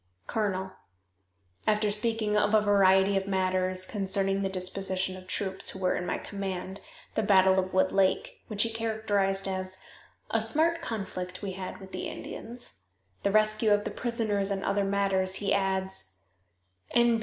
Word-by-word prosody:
"Colonel: 190 -3 -2 0.9
[After 210 -1 +3
speaking 215 0 0
of 210 +1 +3
a 215 - +6
variety 195 -1 +4
of 195 0 -2
matters 185 -1 +1
concerning 195 -1 0
the 195 - 0
disposition 185 0 -2
of 185 0 -11
troops 190 0 -1
who 190 - -4
were 185 -1 +1
in 180 - -3
my - - 0
command, 195 -1 -5 0.3
the - - +1
battle 190 -2 +5
of 185 0 -2
Wood 185 0 +3
Lake 335 - +1
(which 210 -2 +1
he 230 - -1
characterized 210 -4 0
as 185 0 -3 0.5
"A - - +2
smart 330 +2 +1
conflict 190 - -5
we 195 - -2
had 185 0 -6
with 190 0 -11
the - - -4
Indians"), 240 +2 -8 0.5
the - - +1
rescue 215 +1 +3
of 205 0 +4
the - - -3
prisoners 220 -5 -1
and 195 -1 -2
other 200 0 +1
matters, 195 -1 +1
he 200 0 0
adds:] 190 - -1 0.8
"N. 235 -1 +4
195 Hz, 160 wpm, -29 LUFS, 190-215 Hz, 0.9 s, a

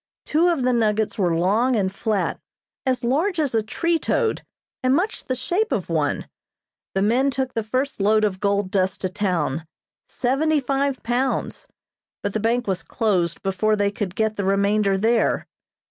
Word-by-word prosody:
Two 325 +3 +3
of 335 -7 +1
the 255 0 +2
nuggets 220 -2 +1
were 175 -4 +2
long 215 +9 +2
and 190 -3 0
flat, 210 0 -1 0.5
as 255 -1 +1
large 320 +9 +1
as 290 -5 0
a 225 - +3
tree 335 +10 0
toad, 455 +5 0 0.4
and 255 0 +3
much 390 +8 -1
the 255 - -1
shape 360 - -1
of - - -1
one. - - 0 0.7
The 195 - +2
men 250 +6 +3
took 265 -1 -2
the 225 - 0
first 255 +2 -2
load 215 +2 +3
of 195 -3 0
gold 200 -1 0
dust 190 -1 0
to 185 - -1
town 170 -6 -1 0.4
seventy 295 +5 +1
five 275 0 -1
pounds 245 +3 -1 0.6
but 205 - -2
the 220 - 0
bank 235 +3 +1
was 190 -2 -1
closed 185 -8 -1
before 195 +3 +1
they 205 -1 +1
could 200 -2 -4
get 220 -1 0
the 200 - -1
remainder 200 +1 +2
there. 225 +3 +2
220 Hz, 175 wpm, -23 LUFS, 200-265 Hz, 0.7 s, Two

